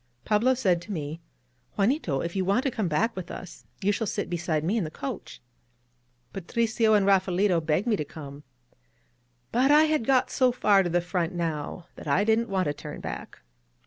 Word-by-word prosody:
Pablo 235 +5 +3
said 185 -9 +1
to 210 - -9
me: 155 -2 -5 0.6
^^Juanito, 195 - +1
if 170 - -5
you 190 - +1
want 200 +7 +1
to 270 - 0
come 215 -5 -1
back 195 +9 0
with 185 -2 -6
us, 180 -2 -9 0.2
you 200 - +3
shall 220 +1 -2
sit 205 -1 -3
beside 165 -3 -1
me 185 +7 0
in 220 - +1
the 155 - -4
coach." 140 -4 -7 0.9
Patricio 220 +3 +1
and 200 -2 +3
Raphaelito 190 -2 +3
begged 160 +5 +1
me 235 -3 +2
to 155 - -2
come. 145 -1 -10 1.1
But 255 +4 +3
I 300 +1 +7
had 310 -7 +1
got 260 -2 +3
so 255 -1 +3
far 205 -5 +4
to 180 - -1
the 175 +1 +1
front 175 0 -2
now 165 0 -3
that - - -9
I 145 +8 +3
didn't 225 +1 +2
want 190 -1 0
to 145 - 0
turn - - -8
back. - - -7
190 Hz, 195 wpm, -27 LUFS, 170-225 Hz, 1.1 s, I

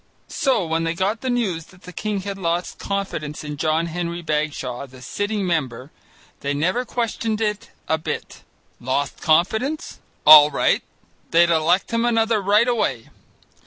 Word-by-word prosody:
So 260 -9 +1
when 165 0 -1
they 165 0 -1
got 200 +5 -1
the 260 - -2
news 195 -10 -1
that 180 0 -20
the 180 - -11
king 210 0 -3
had 195 0 -6
lost 170 0 -2
confidence 190 -8 -4
in 150 -1 -5
John 155 +2 0
Henry 170 0 -4
Bagshaw, 150 -4 -2
the 130 0 -15
sitting 205 - -3
member, 135 -6 -2 0.5
they 140 0 -2
never 185 - 0
questioned 230 -2 -2
it 210 -2 -2 0.2
a 160 - +1
bit. 155 - -5 0.4
Lost 130 +3 -2
confidence? 220 - +1 0.3
All 150 -1 +10
right, 140 - +1 0.5
they'd 170 +1 +4
elect 170 +5 +2
him 230 0 +1
another 225 -2 +2
right 210 +4 +3
away. 135 - -1
175 Hz, 155 wpm, -22 LUFS, 155-210 Hz, 0.5 s, All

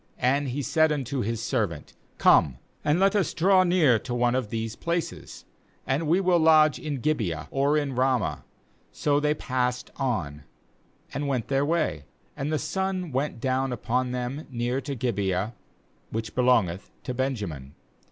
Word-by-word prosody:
KAnd 135 +3 +2
he 135 +3 -3
said 155 +5 +3
unto 135 -2 -2
his 115 +1 -2
servant: 105 - -2 0.2
'Come 70 -7 +4 0.3
and 150 +4 +2
let 195 +2 +3
us 200 -5 +1
draw 185 +2 +5
near 170 -10 +4
to 120 - -5
one 120 0 +2
of 130 -4 -1
these 115 0 -3
places; 170 0 -4 0.4
and 145 +4 0
we 170 +5 +3
will 180 -2 +3
lodge 155 -4 +5
in 140 -1 -4
Gibeah, 110 - -1
or 140 +2 +2
in 145 -2 -1
Ramah.' 125 - 0 0.5
14So 145 0 +1
they 150 0 +2
passed 125 -3 -2
on 85 - -2 0.7
and 145 0 -2
went 130 -5 -1
their 135 0 +2
way; 145 - 0 0.3
and 140 +3 -3
the 155 - +1
sun 190 -1 -2
went 135 -1 -2
down 130 +1 0
upon 125 +2 -1
them 125 +4 -4
near 125 +1 -2
to 140 -1 -4
Gibeah, 100 -3 -1 0.6
which 110 0 -4
belongeth 115 -8 +2
to 125 - -4
Benjamin. 100 - -3
130 Hz, 160 wpm, -26 LUFS, 115-150 Hz, 0.7 s, draw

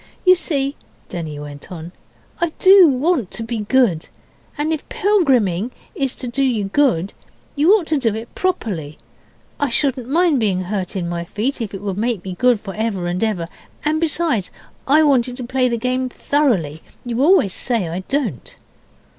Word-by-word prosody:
'You 365 0 +8
see' 280 -5 -2 0.3
Denny 160 -4 -5
went 145 +1 -9
on 170 -1 -7 0.5
'I 340 -2 0
do 380 -2 +8
want 275 - +1
to 230 - -4
be 230 0 -3
good. 210 -6 +1 0.5
And 305 +2 0
if 310 - -6
pilgriming 255 - +2 0.2
is 270 -2 -2
to 255 - -5
do 255 +3 0
you 240 -6 +1
good, 195 - +1 0.4
you 305 +5 +4
ought 390 -6 0
to 310 -2 0
do 225 -5 0
it 225 +2 -8
properly. 195 - -2 0.6
I 285 - +1
shouldn't 255 0 +1
mind 325 -2 +3
being 195 -5 +1
hurt 185 0 -4
in 180 -3 -2
my 170 0 -3
feet 230 +9 -2
if 210 -3 -4
it 195 - -7
would 200 -1 -3
make 225 -5 -1
me 190 - -4
good 245 +3 +2
for 195 -2 -7
ever 215 -4 -2
and 175 +4 -1
ever. 195 -7 -1 0.4
And 310 +1 +1
besides, 315 - 0 0.4
I 300 +3 +5
wanted 255 -4 +2
to 255 - -5
play 255 +1 +1
the 235 - -1
game 255 +2 -1
thoroughly. 215 - 0 0.2
You 240 +1 -2
always 300 - +4
say 230 -8 -1
I 170 +3 -4
don't. 250 - -2
240 Hz, 180 wpm, -19 LUFS, 190-285 Hz, 0.6 s, You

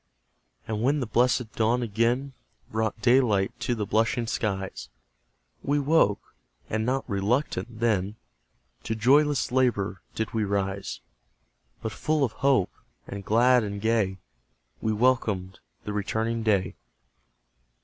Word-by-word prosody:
And 110 -1 -2
when 140 +5 +2
the 130 - -1
blessed 120 0 +1
dawn 115 +2 +1
again 120 +5 0 0.4
Brought 110 0 -1
daylight 120 -6 +3
to 120 - -1
the 105 -2 -2
blushing 115 +3 +1
skies, 95 -4 -3 0.7
We 145 +1 0
woke, 140 -8 +2 0.4
and 110 0 0
not 130 +3 -1
RELUCTANT 115 +2 -1
then, 105 -3 +1 0.7
To 110 - -3
joyless 140 +5 +3
LABOUR 115 -7 +1
did 110 0 -3
we 110 -1 +1
rise; 100 -1 -2 0.8
But 110 - -2
full 150 +7 0
of 125 - +1
hope, 130 -5 +2 0.3
and 100 0 -7
glad 120 +4 +4
and 100 -1 -4
gay, 110 -3 +1 0.6
We 110 - 0
welcomed 105 -5 +1 0.2
the 105 - -4
returning 110 +3 -1
day. 100 -5 +1
110 Hz, 125 wpm, -26 LUFS, 100-125 Hz, 0.8 s, glad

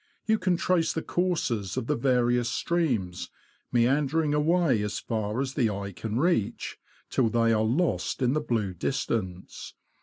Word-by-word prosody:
You 220 0 +2
can 185 -1 +1
trace 175 -2 +1
the 160 - -3
courses 135 - -1
of - - -1
the 150 - 0
various 120 -2 +2
streams, 120 - -1 0.4
meander 135 +6 +2
ing 150 -1 0
away 150 -5 +2
as 105 0 -2
far 110 0 -2
as 135 -1 -2
the 125 -6 +2
eye 100 -1 -4
can 110 +4 -4
reach, 155 - 0 0.3
till 120 -4 +2
they 115 0 +3
are 110 - +2
lost 135 +3 0
in 125 +1 +3
the 155 - +1
blue 110 -9 -1
distance. 95 -2 -3
125 Hz, 160 wpm, -27 LUFS, 110-155 Hz, 0.4 s, they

